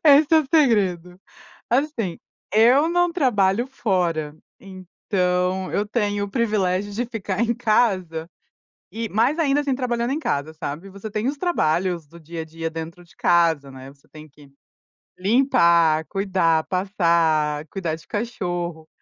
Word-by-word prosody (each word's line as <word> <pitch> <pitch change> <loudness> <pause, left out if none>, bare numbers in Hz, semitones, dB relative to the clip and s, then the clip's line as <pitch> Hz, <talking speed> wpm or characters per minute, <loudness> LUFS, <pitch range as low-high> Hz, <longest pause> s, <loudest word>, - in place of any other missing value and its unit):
É 285 -2 +8
esse 300 -1 +1
é 320 - +8
o 285 - -6
segredo. 195 - +1 0.5
Assim, 245 - 0 0.4
eu 250 +8 +5
não 350 0 +2
trabalho 235 - +2
fora, 175 - -1 0.2
então 185 -1 -2
eu 205 - 0
tenho 205 -2 -1
o 200 - -8
privilégio 205 -3 0
de 235 +4 -2
ficar 205 -4 -4
em 235 0 +2
casa 190 -8 0 0.6
e 225 0 -4
mas, 235 - +1
ainda 290 -2 +2
assim, 280 -3 -1
trabalhando 240 -1 -1
em 290 - -1
casa, 145 - -2
sabe, 155 +4 -6
você 200 +2 -8
tem 215 +3 -2
os 290 - -2
trabalhos 175 - 0
do 170 +4 -15
dia 165 +1 -7
a - - -7
dia 165 +1 -5
dentro 165 +2 -8
de 170 - -23
casa, 165 -5 +2
né, 130 0 -11
você 140 - -28
tem 155 0 -13
que 145 -1 -19 0.7
limpar, 170 - +3
cuidar, 185 -5 +1
passar, 165 -6 +1
cuidar 175 -4 -3
de 160 - -18
cachorro. 175 -8 -4
190 Hz, 150 wpm, -22 LUFS, 165-235 Hz, 0.7 s, É